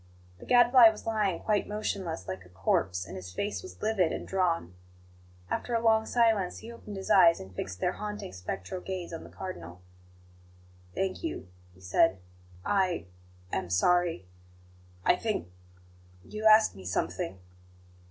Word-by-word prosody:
The - - -12
Gadfly 245 -1 +8
was 215 - -8
lying 210 -5 0
quite 210 -2 +1
motionless, 195 - -3
like 95 -1 -5
a 90 - -18
corpse, 90 -1 0
and 95 - -9
his 90 -1 -8
face 205 - -3
was 375 - -11
livid 210 -6 +2
and - - -5
drawn. 170 - 0 0.7
After 240 - -2
a - - +3
long 220 -1 +3
silence, 225 -6 +2
he 230 - -9
opened 210 -3 -9
his 190 - -4
eyes, 170 -3 +7
and 95 0 -10
fixed 90 0 -5
their 180 - +1
haunting, 210 - -6
spectral 95 - -5
gaze 180 -3 -5
on 165 - -6
the - - -12
Cardinal. 90 - -8 1.2
"Thank 190 -1 -2
you," 320 - -4 0.3
he 95 - -20
said. 95 +1 +3 0.5
"I 185 - +1 0.5
am 95 -2 -2
sorry. 170 - +2 0.8
I - - +5
think 205 - -3 0.7
you 215 +1 -6
asked 215 - +6
me 95 - -11
something?" 90 +1 -2
180 Hz, 150 wpm, -29 LUFS, -, 1.2 s, Gadfly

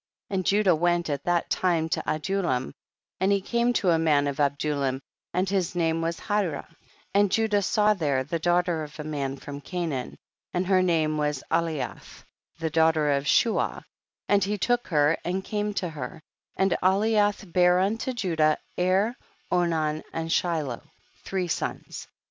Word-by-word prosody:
And 190 -1 0
Judah 200 -2 +4
went 175 0 +1
at 140 -1 -3
that 175 -1 0
time 170 -3 +1
to - - 0
Adulam, 155 - -1 0.5
and 190 +1 +2
he 200 - +3
came 235 +5 +1
to 190 -6 +2
a 165 - +3
man 150 -3 +3
of 140 -1 -2
Adulam, 140 -2 0 0.3
and 180 +2 0
his 185 -3 -1
name 165 -1 +1
was 165 +1 -2
Hirah, 200 -8 -1 0.5
and 200 -1 +3
Judah 215 -1 +2
saw 210 +2 +3
there 145 -8 0
the 165 +5 -3
daughter 175 0 +1
of 150 0 -9
a - - -3
man 140 -3 -3
from 145 +1 -8
Canaan, 165 -7 -4 0.4
and 180 +1 +1
her 185 0 +3
name 160 -4 +1
was 150 -2 -1
Aliyath, 165 -3 -2 0.3
the 165 -1 -3
daughter 160 -2 +3
of 140 0 0
Shua, 225 +9 +2 0.4
and 200 -1 +3
he 205 +2 -1
took 245 +4 0
her, 150 -1 +3
and 185 +2 -2
came 210 0 -2
to 180 - -1
her, 150 -1 -7 0.3
and 190 -1 +2
Aliyath 205 0 +2
bare 180 0 +5
unto 220 +7 0
Judah, 165 -10 +1 0.2
Er, 190 +6 +2 0.4
Onan 160 -3 +1
and 165 0 -3
Shiloh; 155 -9 0 0.4
three 185 -2 -2
sons. - - -4
170 Hz, 160 wpm, -26 LUFS, 155-195 Hz, 0.5 s, bare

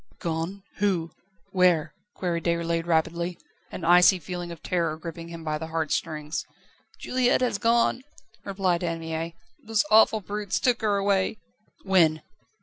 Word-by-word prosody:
"Gone? 170 +4 -3
Who? 180 -5 0 0.4
Where?" 175 -4 +3 0.2
queried 170 -3 -2
Déroulède 170 0 0
rapidly, 170 +1 0 0.3
an 165 - -6
icy 180 +2 +6
feeling 175 +1 -6
of 170 - -10
terror 170 -3 -1
gripping 165 +1 -8
him 170 -1 -9
by 155 -1 -2
the 160 - -5
heart 160 -1 -2
strings. 150 0 -2 0.5
"Juliette 255 0 +1
has 240 -6 0
gone," 235 +2 +2 0.4
replied 190 -3 0
Anne 165 -1 -2
Mie; 165 +1 -4 0.3
"those 220 -1 +1
awful 220 0 +6
brutes 205 0 -3
took 245 -2 +1
her 210 -2 +2
away." 200 +1 +1 0.5
"When?" 165 -5 +3
175 Hz, 145 wpm, -26 LUFS, 165-200 Hz, 0.5 s, icy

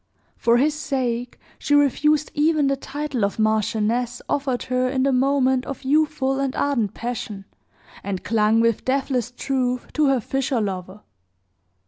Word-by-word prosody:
For 235 0 +3
his 295 +4 +2
sake 250 -5 -2 0.2
she 290 - +1
refused 290 +2 +2
even 305 0 +2
the 275 0 +2
title 280 -3 -4
of 200 - -1
marchioness, 220 +3 0
offered 270 -3 -1
her 255 0 0
in 260 0 0
the 275 - +2
moment 260 0 +2
of 275 0 -6
youthful 280 -1 +1
and 275 -1 -1
ardent 240 -8 0
passion, 225 -4 -5 0.6
and 195 -2 -4
clung, 220 0 +2
with 230 -2 +1
deathless 260 -2 0
truth, 250 -1 -2
to 305 -1 +2
her 270 -2 +3
fisher 270 +2 -1
lover. 190 -1 -4
255 Hz, 145 wpm, -22 LUFS, 230-275 Hz, 0.6 s, For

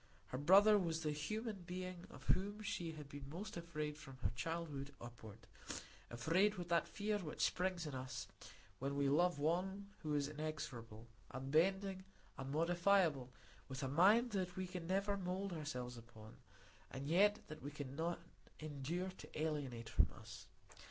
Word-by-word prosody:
Her 130 - -2
brother 200 +7 +8
was 165 -3 0
the 150 - +1
human 215 +9 -2
being 180 0 -5
of - - -11
whom 205 +3 +2
she 175 -5 -2
had 150 -2 -8
been 140 -1 -8
most 195 +7 -5
afraid 155 -3 -3
from 135 -4 -10
her 95 - +2
childhood 145 0 -3
upward; 110 -3 -9 0.7
afraid 170 - +3
with 175 -2 -5
that 170 -1 +3
fear 210 0 0
which 160 -6 0
springs 180 -2 0
in 150 - -4
us 130 0 -4 0.5
when 140 +1 -1
we 140 0 +3
love 175 +3 +4
one 190 +6 0
who 150 -2 0
is 140 -1 +2
inexorable, 140 -7 -5 0.2
unbending, 185 +9 +2 0.3
unmodifiable, 165 0 +3 0.4
with 135 +1 -4
a - - +1
mind 205 - +6
that 185 -3 -1
we 185 - -1
can 180 -2 -5
never 200 +2 +2
mould 190 +1 -2
ourselves 125 -6 -4
upon, 110 -1 -13 0.5
and 135 +2 -5
yet 205 +6 +5
that 155 0 -8
we 145 - -4
cannot 150 +4 -3 0.4
endure 155 +5 -2
to - - -8
alienate 140 -7 -1
from - - +4
us. - - -10
165 Hz, 155 wpm, -40 LUFS, 140-185 Hz, 0.7 s, brother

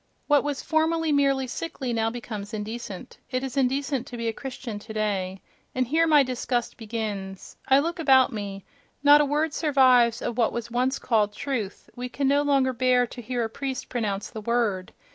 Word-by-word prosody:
What 290 -1 +4
was 290 -2 -3
formerly 320 0 +1
merely 275 -2 +2
sickly 260 -1 -4
now 225 -1 +1
becomes 220 -3 -6
indecent—it 225 +3 -6
is 265 -2 -5
indecent 270 0 0
to 245 - -7
be 230 0 -3
a 225 - 0
Christian 255 -4 -6
today. 205 -3 -3 0.3
And 255 0 +1
here 320 +6 +2
my 300 -3 +6
disgust 250 -1 -2
begins.—I 215 +2 -2
look 335 +5 0
about 265 -4 +5
me: 200 -2 -6 0.4
not 290 +1 +8
a - - +3
word 295 +2 0
survives 255 -7 +4
of 240 - -3
what 230 - +2
was 235 0 -5
once 255 +3 +1
called 210 -4 +1
"truth"; 225 -6 -4
we 250 +1 -5
can 275 +2 -1
no 285 +1 +4
longer 275 -3 +2
bear 250 0 +3
to 245 +1 -9
hear 245 +1 -2
a - - 0
priest 265 +1 -4
pronounce 210 -5 -2
the 220 - -7
word. 215 -5 0
250 Hz, 180 wpm, -25 LUFS, 220-275 Hz, 0.4 s, not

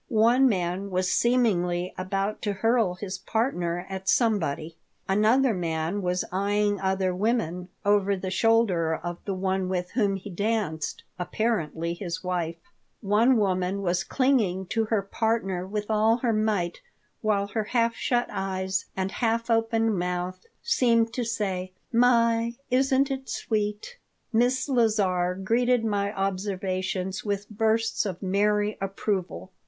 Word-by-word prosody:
One 240 +4 +4
man 185 -1 -1
was 185 -1 0
seemingly 185 -8 +1
about 195 +3 -2
to 205 - -1
hurl 225 -2 +2
his 190 0 -5
partner 180 -7 -1
at 190 0 -4
somebody. 165 - +1 0.3
Another 220 +6 +3
man 170 +1 -2
was 180 0 -1
eying 205 +1 +1
other 190 -1 0
women 185 -3 -1 0.2
over 200 -1 +3
the 185 0 -4
shoulder 190 -6 +2
of 175 +1 -5
the 195 - -2
one 190 0 -1
with 180 -1 -2
whom 205 -5 +1
he 195 +1 -7
danced, 200 -5 -2 0.2
apparently 170 -4 -1
his 175 -1 -5
wife. 175 -3 -2 0.5
One 225 +5 +4
woman 190 -1 0
was 175 -1 +1
clinging 225 -9 +1
to 225 -1 +1
her 215 -2 0
partner 195 -4 -1
with 210 +1 -3
all 220 +1 +3
her 235 -2 0
might, 210 -5 0 0.4
while 210 -2 +1
her 215 +1 -2
half 230 +1 +1
shut 240 +1 0
eyes 190 0 -2
and 190 0 -1
half 230 0 0
opened 225 -2 +2
mouth 180 - -3 0.2
seemed 230 - +2
to 250 - -1
say, 190 -5 -2 0.2
"My, 235 -1 +3 0.2
isn't 270 +1 +3
it 265 0 -4
sweet!" 210 - -2 0.3
Miss 250 +4 +2
Lazar 205 -8 +2
greeted 230 +5 +1
my 200 -2 0
observations 190 -1 -2
with 205 -1 -2
bursts 225 +1 +1
of 185 0 -6
merry 210 +2 +1
approval. 190 - -3
200 Hz, 135 wpm, -26 LUFS, 185-225 Hz, 0.5 s, One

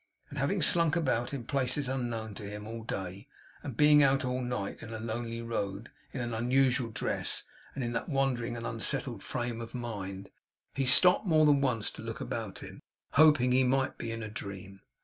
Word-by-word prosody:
And - - -6
having - - 0
slunk 170 -2 +5
about, 130 -8 0
in 140 -4 -5
places 140 +2 +1
unknown 120 -4 -3
to 100 0 -7
him 105 0 -8
all 115 +1 -7
day; 95 -3 -6 0.3
and 130 -6 -7
being 150 0 +6
out 135 -1 +3
at 125 - -2
night, 120 -5 -4
in 115 - -9
a 110 - -5
lonely 115 +1 -5
road, 105 -1 -4 0.2
in 130 - -5
an 120 -1 -4
unusual 125 +1 +1
dress 110 - 0 0.3
and 135 - -3
in 120 0 -3
that - - -3
wandering 125 -4 -1
and 115 - -6
unsettled 115 0 +1
frame 120 -2 -4
of 115 +2 -9
mind; 100 -5 -6 0.4
he 135 -2 -1
stopped 180 +9 +7
more 155 -2 +4
than 145 -2 +4
once 120 -6 0
to - - -11
look - - -6
about - - -5
him, - - -11 0.3
hoping 150 -4 +5
he 130 +1 +4
might 130 +1 0
be 115 - -4
in 115 -1 -5
a - - -5
dream. 100 -2 -8
120 Hz, 195 wpm, -30 LUFS, 110-135 Hz, 0.4 s, stopped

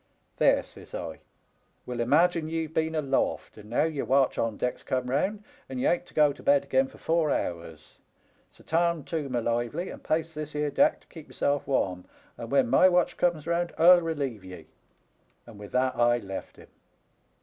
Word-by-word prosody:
" - - -43
* - - -43
There,' - - +4
says - - -12
I, 80 - -6 0.3
* - - -42
we'll 125 -1 -5
imagine 155 +6 +2
ye've 160 -1 -3
been 160 0 0
aloft, 140 -3 -1
and 105 0 -13
now 120 - +2
your 155 -3 -2
watch 135 0 +2
on 115 -2 -1
deck's 125 - -2
come 125 -1 -2
round, 200 +10 -1 0.3
and 130 -1 -5
ye - - -1
ain't 175 0 +1
to - - -18
go 150 -2 +4
to - - -15
bed 140 0 +3
again 135 -1 +1
for - - -16
four 165 -2 +1
hours. 85 - -4 0.5
So - - -20
tarn 170 -1 0
too, 155 -3 -4
my 120 -2 -1
lively, 120 +10 -2
and - - -11
pace 160 +1 -1
this 150 -1 -7
'ere 150 0 -1
deck 295 - +2
to - - -25
keep 160 -3 -12
yourself 140 -1 -1
warm, 95 -10 -1 0.3
and 115 - -8
when 135 -2 +3
my 160 +10 +5
watch 180 -1 +2
comes 170 -4 0
round 170 0 -1
1*11 175 +2 +6
relieve 140 -10 -3
ye.' 90 -3 -10 0.8
And 110 -3 -13
with 105 -1 -10
that 130 0 +1
I 120 0 +3
left 95 -4 -7
him. - - -16
140 Hz, 205 wpm, -27 LUFS, 120-160 Hz, 0.8 s, 1*11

